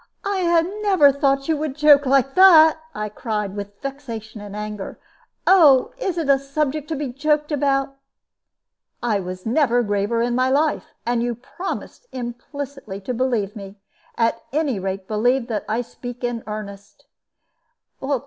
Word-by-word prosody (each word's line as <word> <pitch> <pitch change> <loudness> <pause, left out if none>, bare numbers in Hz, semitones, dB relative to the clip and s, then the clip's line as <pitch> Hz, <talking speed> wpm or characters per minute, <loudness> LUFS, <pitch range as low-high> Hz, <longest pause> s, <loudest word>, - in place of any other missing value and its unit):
"I 350 -4 +2 0.2
never 375 -9 +5
thought 275 -1 0
you 320 - +2
would 300 -2 -3
joke 290 -2 +5
like 270 0 +3
that," 320 -4 +7 0.2
I 210 0 -3
cried, 210 -2 -4
with 205 0 -7
vexation 235 -6 -7
and 205 0 -9
anger. 210 -1 -6 0.5
"Oh, 300 -9 +6
is 375 -7 -2
it 325 -4 -1
a 275 -1 +4
subject 285 +1 -2
to 320 - -3
be 285 -2 -3
joked 300 +4 0
about?" 275 -1 0 1.1
"I 220 -4 +1 0.3
never 245 +1 +2
was 240 - +2
graver 205 +3 0
in 240 0 0
my 255 +1 +2
life; 295 +3 0
and 240 0 0
you 240 0 -1
promised 350 - -7
implicitly 250 -2 -7
to 225 +6 -4
believe 235 -5 -1
me. 195 -1 -9 0.4
At 230 0 +1
any 280 -7 0
rate, 190 0 -4
believe 240 +4 +1
that 215 -3 -2
I 225 +3 0
speak 245 +1 -9
in 240 -2 -2
earnest." 205 -1 -8
255 Hz, 150 wpm, -22 LUFS, 220-290 Hz, 1.1 s, that